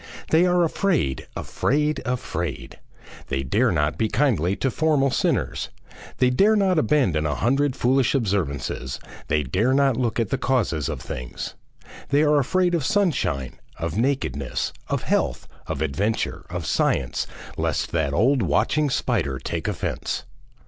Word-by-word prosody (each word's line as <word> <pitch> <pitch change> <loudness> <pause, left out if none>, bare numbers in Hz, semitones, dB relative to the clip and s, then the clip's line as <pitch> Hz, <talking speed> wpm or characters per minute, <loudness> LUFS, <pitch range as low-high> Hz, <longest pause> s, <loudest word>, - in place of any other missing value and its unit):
They 165 +3 +5
are 180 -1 +3
afraid, 165 - 0
afraid, 150 +3 0
afraid; 85 - -3 0.5
they 65 0 -1
dare 65 - +2
not 75 +1 0
be 110 - +1
kindly 100 - +2
to 135 - -1
formal 150 -3 +2
sinners, - - 0 0.5
they 125 0 +3
dare 200 +12 +4
not 190 -5 +3
abandon 105 - +2
a 75 - -1
hundred 135 - +1
foolish 130 +1 +2
observances; 80 - -1 0.3
they 75 0 +1
dare 105 - +1
not 140 -3 +3
look 120 -2 0
at 115 -4 0
the - - -1
causes 100 - 0
of - - -4
things. 60 0 -6 0.6
They 145 +2 +4
are 150 -1 +4
afraid 180 +6 +1
of 165 -4 +1
sunshine, 130 - 0 0.2
of 85 0 -3
nakedness, 115 - -1
of - - -1
health, - - 0 0.2
of 70 - -2
adventure, 100 +10 -1
of - - -4
science, - - 0 0.3
lest - - -1
that 80 -4 0
old 120 - +3
watching 130 - +2
spider 70 - 0
take 65 - -4
offence. - - -3
125 Hz, 145 wpm, -24 LUFS, -, 0.6 s, They